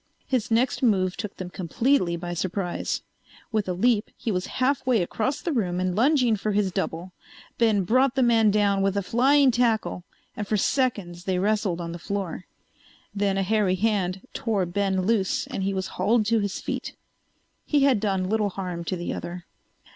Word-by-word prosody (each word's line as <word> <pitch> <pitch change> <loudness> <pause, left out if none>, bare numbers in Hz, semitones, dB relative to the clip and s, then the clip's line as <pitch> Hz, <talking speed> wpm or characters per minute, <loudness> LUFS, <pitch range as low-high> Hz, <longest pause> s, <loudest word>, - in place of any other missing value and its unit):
His 250 -2 -1
next 235 +3 +1
move 190 -7 +2
took 210 -3 -6
them 180 -1 -6
completely 185 - +1
by 175 +1 -5
surprise. 180 +1 -2 0.5
With 215 -4 -1
a - - 0
leap 215 +3 +2
he 230 - -2
was 180 -2 -2
half 260 +2 +1
way 245 -7 +2
across 260 - -2
the 340 - -1
room 185 - 0
and 185 -1 -1
lunging 250 -1 +3
for 210 +1 -2
his 200 -2 +1
double. 175 +2 -3 0.5
Ben 220 -4 +3
brought 255 +7 +2
the 265 - +3
man 225 -3 +4
down 200 -1 +2
with 195 0 +1
a 200 - 0
flying 265 +6 +4
tackle 230 -6 0 0.3
and 210 - -4
for 215 - +1
seconds 200 -8 -1
they 185 -1 0
wrestled 200 -2 0
on 170 -1 -4
the 170 - -7
floor. 195 -2 -4 0.7
Then 200 -1 0
a 195 - +1
hairy 205 -2 +2
hand 190 -2 0
tore 210 -5 0
Ben 190 +1 0
loose 205 -3 +1
and - - -5
he 195 +1 0
was 190 -1 -2 0.2
hauled 215 +3 +3
to 225 +1 +2
his 200 -2 -2
feet. - - -5 0.7
He 290 -2 +3
had 270 -6 +4
done 195 -3 0
little 210 0 +1
harm 180 -3 -5
to 185 - -2
the 175 -1 -4
other. 175 0 -6
200 Hz, 185 wpm, -25 LUFS, 185-230 Hz, 0.7 s, man